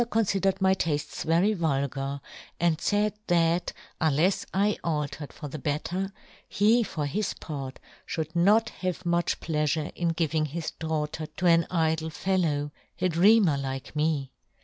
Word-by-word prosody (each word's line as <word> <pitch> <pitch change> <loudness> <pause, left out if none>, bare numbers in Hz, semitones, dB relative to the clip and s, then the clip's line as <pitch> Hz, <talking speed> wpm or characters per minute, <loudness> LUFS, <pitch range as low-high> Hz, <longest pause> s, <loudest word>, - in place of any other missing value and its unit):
confidered 195 -4 +1
my 190 0 +4
taftes 150 -5 -2
very 170 +6 +3
vulgar, 140 -5 -1 0.2
* - - -20
and 165 -2 +2
faid 210 0 +1
that, 170 0 +2 0.3
unlefs 160 +5 +2
I 205 +2 +1
altered 150 -2 -2
for 150 - -8
the 150 +2 -6
better, 175 +7 -2 0.4
he, 220 +4 +4
for 155 -9 -2
his 200 +9 -2
part, 135 -3 -6 0.3
fhould 160 0 -3
not 205 +6 +4
have 185 0 -4
much 170 0 +1
pleafure 150 0 -1
in 175 - -1
giving 160 -2 0
his 160 +2 -4
daughter 155 -1 -3
to 180 - -5
an 170 -1 +5
idle 160 -2 +1
fellow, 155 -4 0 0.3
a 185 - +2
dreamer 180 -2 +5
' - - -3
like 135 +1 -5
me. 150 -3 0
165 Hz, 150 wpm, -27 LUFS, 150-185 Hz, 0.4 s, an